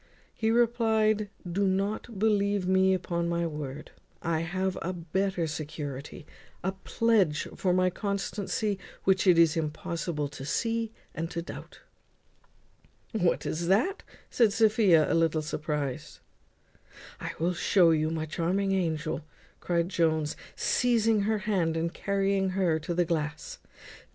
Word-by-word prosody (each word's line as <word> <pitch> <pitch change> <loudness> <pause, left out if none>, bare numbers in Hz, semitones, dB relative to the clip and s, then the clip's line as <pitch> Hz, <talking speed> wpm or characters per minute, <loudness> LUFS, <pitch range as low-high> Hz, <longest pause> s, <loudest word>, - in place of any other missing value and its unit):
He 220 - -1
replied, 220 -3 +2 0.2
"Don't 195 +4 -1
believe 200 -2 +1
me 190 0 +4
upon 170 -2 -2
my 170 0 0
word; 150 -2 -6 0.3
I 165 -2 0
have 185 +3 -1
a 185 +2 -2
better 180 +1 -1
security, 150 0 -6 0.4
a 190 - 0
pledge 190 -4 +1
for 185 - 0
my 185 0 +3
constancy, 200 +1 -2 0.2
which 190 0 +2
it 180 -2 +6
is 165 -1 +5
impossible 160 -1 -2
to 145 -1 -9
see 230 +8 -1 0.2
and 165 0 -3
to 170 -1 -4
doubt." - - -10 1.3
"What 180 -7 +1
is 170 +2 -2
that?" 230 - +2 0.3
said 225 -4 +3
Sophia, 210 -8 +5
a - - 0
little 165 -1 +2
surprized. 150 -3 -3 1.0
"I - - -5
will 170 +3 0
show 175 -1 +4
you, 155 -1 +2
my 160 -1 -2
charming 180 +5 0
angel," 160 -4 -1 0.4
cried 170 0 0
Jones, 160 -4 +1 0.2
seizing 225 -3 +2
her 220 - +2
hand 175 -6 +1
and 165 +1 -1
carrying 195 -1 0
her 170 -5 +2
to 165 +2 -4
the 175 0 +2
glass. 165 - -3
180 Hz, 130 wpm, -28 LUFS, 160-200 Hz, 1.3 s, it